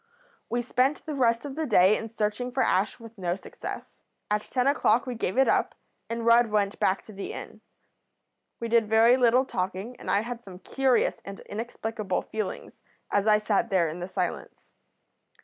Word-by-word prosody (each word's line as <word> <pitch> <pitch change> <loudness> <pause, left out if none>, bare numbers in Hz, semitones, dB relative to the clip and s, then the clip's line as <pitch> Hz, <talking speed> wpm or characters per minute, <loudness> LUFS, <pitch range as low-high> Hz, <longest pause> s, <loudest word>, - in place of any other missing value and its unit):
We 240 +1 -1
spent 255 +4 0
the 310 - -4
rest 235 -2 +1
of 280 - -5
the 315 0 -2
day 190 0 +5
in 225 - -5
searching 220 +3 -2
for 260 +1 +1
Ash 195 +6 +1
with 230 -2 -13
no 175 -1 -1
success. 195 - -7 0.5
At 210 0 +2
ten 250 +3 -1
o'clock 270 -4 +3
we 250 - -3
gave 225 -2 -3
it 270 - +5
up, - - +1 0.3
and 230 0 -3
Rudd 235 0 +6
went 205 -1 0
back 190 - +1
to 215 - -13
the 195 0 -6
inn. - - -9 1.0
We 235 - -3
did 230 -1 +3
very 225 +2 +6
little 250 +1 +4
talking, 190 +2 -4
and - - -7
I 200 - +3
had 240 +1 -6
some 190 -4 -11
curious 260 +6 +1
and 195 0 -8
inexplicable 220 -2 -4
feelings 215 -2 -6 0.3
as 205 +1 +1
I 210 -1 +6
sat 210 +1 0
there 185 -5 +2
in 165 +3 -6
the 175 - -4
silence. 185 -2 -5
225 Hz, 185 wpm, -27 LUFS, 200-245 Hz, 1.0 s, Rudd